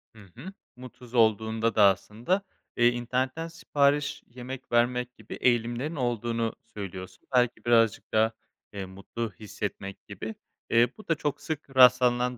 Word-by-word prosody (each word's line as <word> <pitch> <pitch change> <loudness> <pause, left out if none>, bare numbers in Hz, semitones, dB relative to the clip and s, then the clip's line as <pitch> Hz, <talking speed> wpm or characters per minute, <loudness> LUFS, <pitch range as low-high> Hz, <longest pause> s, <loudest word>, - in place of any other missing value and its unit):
Hı - - -14 0.2
hı. 165 +11 -9 0.2
Mutsuz 125 -1 -13
olduğunda 110 0 +2
da 105 - +6
aslında, 110 - +2 0.4
eee, 120 - +5
internetten 130 +6 -2
sipariş 145 -3 0
yemek 125 +2 -9
vermek 125 +1 +1
gibi - - -10
eğilimlerin 120 +5 0
olduğunu 115 -3 -1 0.2
söylüyorsun. 95 -2 -7
Belki 125 -1 +2
birazcık 115 -3 +3
daha, 110 +1 +4 0.4
eee, 100 -2 -5
mutlu 100 +4 -6
hissetmek 100 -2 -6
gibi. 105 +2 -6 0.3
Eee, 115 +1 +5
bu 215 - -14
da 165 - +2
çok 145 -1 -3
sık 145 -3 -6
rastlanılan 125 -1 +5
120 Hz, 135 wpm, -27 LUFS, 110-130 Hz, 0.4 s, da